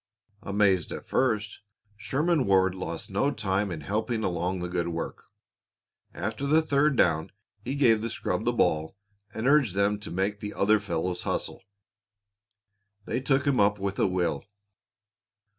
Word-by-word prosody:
Amazed 100 -3 +1
at - - -6
first, 105 -5 0 0.4
Sherman 150 +5 0
Ward 95 -1 +4
lost 85 -1 -6
no 105 +9 +1
time 100 -5 -1
in 80 -4 -5
helping 110 - -2
along 90 0 -1
the 90 -1 -3
good 85 -1 -2
work. 85 -1 -5 0.9
After 140 - -4
the 155 +3 +4
third 145 -1 +2
down 80 -7 +2 0.3
he 135 - -3
gave 115 -6 +4
the 115 - -2
scrub - - -2
the - - +2
ball 80 +4 0 0.3
and 110 - -5
urged 140 -8 +4
them 100 +1 +1
to 105 - -8
make 95 +4 -1
the 105 0 -6
other 105 +2 +3
fellows 90 -2 -2
hustle. - - -3 1.4
They 125 - -2
took 135 +1 +1
him 140 -3 +2
up 105 0 +4
with 100 0 -3
a - - +3
will. 90 -6 -1
100 Hz, 155 wpm, -27 LUFS, 90-125 Hz, 1.4 s, Ward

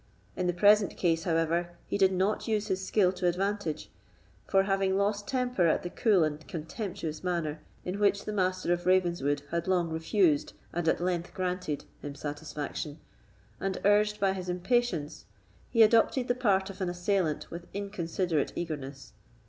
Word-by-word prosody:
In 180 - -1
the - - +3
present 205 +2 +4
case, 165 -2 +1
however, 170 +1 0
he - - -3
did 195 -1 +4
not 190 +5 0
use 215 -1 0
his 190 0 -1
skill 190 -2 +3
to 180 -1 -1
advantage; 190 -2 -1 0.6
for, 195 0 +4
having 195 -1 +1
lost 205 +1 0
temper 250 -9 +1
at 160 - +2
the 175 - -5
cool 205 -6 +3
and 155 -1 -3
contemptuous 165 - -5
manner 170 -4 -1 0.3
in 185 +3 -3
which 200 -1 +2
the 210 - -3
Master 185 -2 +1
of 175 0 -3
Ravenswood 170 -6 +2
had 170 +1 -1
long 175 -3 +1
refused, 160 -1 +2 0.2
and 175 -1 -2
at 160 - +2
length 175 -1 -2
granted, 180 -5 -2 0.2
him 145 -1 -6
satisfaction, 150 0 -5 0.6
and 195 -1 -2
urged 210 +1 +4
by 195 -1 +2
his 185 -1 -5
impatience, 180 - 0 0.4
he 230 -2 +6
adopted 230 +3 +4
the 245 - +3
part 200 -6 +1
of 195 +1 -11
an 185 - 0
assailant 175 -3 -1
with 170 +1 -7
inconsiderate 180 -5 -2
eagerness. 145 -5 -5
180 Hz, 165 wpm, -29 LUFS, 165-200 Hz, 0.6 s, he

